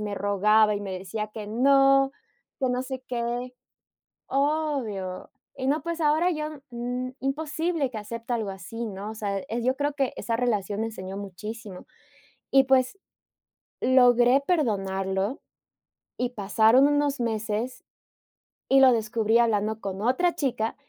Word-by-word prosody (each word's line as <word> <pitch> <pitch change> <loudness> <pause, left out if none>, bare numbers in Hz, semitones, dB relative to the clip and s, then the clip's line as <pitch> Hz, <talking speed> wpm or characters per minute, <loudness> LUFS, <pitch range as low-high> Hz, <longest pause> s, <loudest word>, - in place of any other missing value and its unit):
me 210 -1 -3
rogaba 210 +2 +3
y 205 - -5
me 195 -2 -5
decía 195 +3 -4
que: 210 -2 -6
"No, 270 +3 +4 0.5
que 260 - +1
no 250 +1 -1
sé 260 -1 -6
qué", 245 +1 -3 0.7
obvio, 275 -10 -1 0.3
y 260 -1 -3
no, 295 +3 +2
pues, 335 0 -3
ahora 315 +4 +3
yo, 305 -1 -3 0.3
n 245 +2 -4
imposible 305 +2 -1
que 220 - -4
acepte 230 +3 -6
algo 220 -4 -2
así, 195 +5 -6
¿no?, 205 +1 -6
o - - -7
sea, 200 -2 -2 0.2
yo 255 +2 +1
creo 290 0 -1
que, 270 -3 0
esa 230 - -2
relación 210 -4 -1
enseñó 195 -4 -6
muchísimo 205 +1 -8 0.6
y, 270 0 +5
pues, 265 +6 +2 0.8
logré 245 0 +5
perdonarlo, 195 - 0 0.8
y 250 - -1
pasaron 220 +4 +4
unos 290 -2 +1
meses, 225 +1 -2 0.9
y 270 - +6
lo 260 -1 +8
descubrí 225 0 +1
hablando 220 -2 +1
con 195 0 -5
otra 260 +10 +2
chica 240 -6 -1
235 Hz, 140 wpm, -26 LUFS, 210-270 Hz, 0.9 s, lo